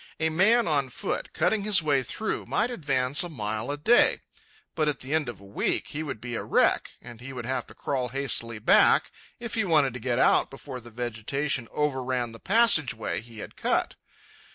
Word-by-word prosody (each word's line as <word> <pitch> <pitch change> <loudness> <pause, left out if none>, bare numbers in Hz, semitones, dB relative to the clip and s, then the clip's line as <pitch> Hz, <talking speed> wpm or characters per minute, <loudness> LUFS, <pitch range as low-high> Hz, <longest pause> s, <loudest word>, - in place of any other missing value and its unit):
A 160 0 +2
man, 215 +9 +3
on 140 -4 +1
foot, - - -4
cutting 220 -2 +1
his 200 -4 +2
way 145 -3 +2
through, 215 - -4
might 230 +4 0
advance 140 - +2
a 175 - -2
mile 110 -4 -3
a 145 - -2
day, 225 +11 +4 0.5
but 155 -2 0
at 150 - -1
the 135 +4 -5
end 155 -5 +1
of 115 - -8
a 100 - -15
week 100 - -2
he 150 - -4
would 140 -8 -5
be 120 +2 -6
a - - -2
wreck, - - +1
and 120 -1 -11
he 130 +2 -8
would 125 -3 -6
have 130 +2 -2
to - - -15
crawl 130 -3 -2
hastily 120 -3 -3
back 105 - +4 0.3
if 235 -2 -6
he 225 - +1
wanted 150 -8 +3
to 125 - -6
get 120 0 -1
out - - +4
before 135 -1 -8
the 120 0 -12
vegetation 120 +3 -2
overran 130 -4 -1
the 115 - -12
passage 195 - +3
way 110 -1 -3
he 115 0 -14
had - - -18
cut. - - 0
135 Hz, 205 wpm, -26 LUFS, 120-160 Hz, 0.5 s, day